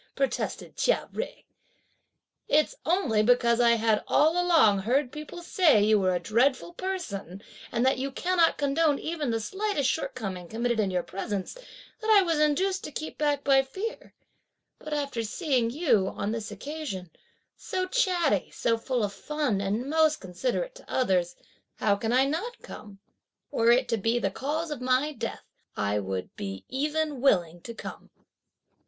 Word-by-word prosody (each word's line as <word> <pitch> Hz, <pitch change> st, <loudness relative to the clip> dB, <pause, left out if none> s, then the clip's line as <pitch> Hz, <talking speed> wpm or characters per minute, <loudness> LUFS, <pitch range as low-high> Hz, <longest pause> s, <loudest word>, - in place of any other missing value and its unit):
protested 275 Hz, -1 st, -2 dB
Chia -, -, +1 dB
Jui. -, -, -5 dB, 1.0 s
"It's 305 Hz, +1 st, +3 dB
only 290 Hz, -, +2 dB
because 235 Hz, +1 st, +3 dB
I 235 Hz, -1 st, +5 dB
had 220 Hz, -1 st, +1 dB
all 305 Hz, +2 st, +4 dB
along 320 Hz, -, +4 dB
heard 250 Hz, +6 st, +1 dB
people 305 Hz, +3 st, -8 dB
say 340 Hz, -, +4 dB
that -, -, +4 dB
you 215 Hz, -1 st, +5 dB
were 185 Hz, -1 st, +2 dB
a -, -, 0 dB
dreadful 255 Hz, -, +1 dB
person, 230 Hz, -, -5 dB, 0.3 s
and 240 Hz, +1 st, +1 dB
that 265 Hz, -1 st, +2 dB
you 275 Hz, +1 st, -2 dB
cannot 345 Hz, +3 st, +2 dB
condone 290 Hz, +1 st, +2 dB
even 310 Hz, -4 st, -3 dB
the 225 Hz, -1 st, 0 dB
slightest 385 Hz, -, -1 dB
shortcoming 195 Hz, -, -4 dB
committed 235 Hz, +3 st, -1 dB
in 205 Hz, -3 st, +2 dB
your 180 Hz, -2 st, -1 dB
presence, 195 Hz, 0 st, -4 dB
that -, -, -10 dB
I 415 Hz, -3 st, +7 dB
was 330 Hz, -4 st, 0 dB
induced 370 Hz, +6 st, +1 dB
to -, -, -6 dB
keep 310 Hz, +2 st, -6 dB
back 290 Hz, -2 st, +1 dB
by 270 Hz, -1 st, +5 dB
fear; 380 Hz, -, -6 dB, 0.6 s
but 305 Hz, -, -9 dB
after 280 Hz, -5 st, -2 dB
seeing 245 Hz, -, 0 dB
you, 240 Hz, -, +2 dB
on 200 Hz, +2 st, -3 dB
this 225 Hz, -1 st, -4 dB
occasion, 280 Hz, -, -6 dB, 0.4 s
so 370 Hz, 0 st, -3 dB
chatty, 365 Hz, -, +1 dB
so 230 Hz, -1 st, 0 dB
full 245 Hz, 0 st, -1 dB
of 200 Hz, -1 st, -2 dB
fun 290 Hz, -9 st, -1 dB
and 210 Hz, +6 st, -1 dB
most 315 Hz, 0 st, +3 dB
considerate 250 Hz, -, -3 dB
to -, -, -14 dB
others, 180 Hz, -8 st, +1 dB, 0.4 s
how 205 Hz, -2 st, +2 dB
can 225 Hz, +3 st, -2 dB
I 260 Hz, +2 st, +4 dB
not 350 Hz, -, -3 dB
come? 205 Hz, -2 st, -10 dB, 0.5 s
were 230 Hz, -4 st, +2 dB
it 250 Hz, +2 st, +4 dB
to 230 Hz, -, +1 dB
be 225 Hz, +3 st, +1 dB
the 195 Hz, -5 st, 0 dB
cause 305 Hz, -, -3 dB
of 285 Hz, -4 st, -5 dB
my 255 Hz, +4 st, +2 dB
death, 230 Hz, -4 st, -5 dB, 0.3 s
I 100 Hz, +1 st, 0 dB
would 95 Hz, -2 st, -4 dB
be 95 Hz, -1 st, -6 dB
even 300 Hz, 0 st, -1 dB
willing 175 Hz, -10 st, +2 dB
to 235 Hz, +4 st, -8 dB
come!" -, -, -9 dB
260 Hz, 165 wpm, -27 LUFS, 210-310 Hz, 1.0 s, I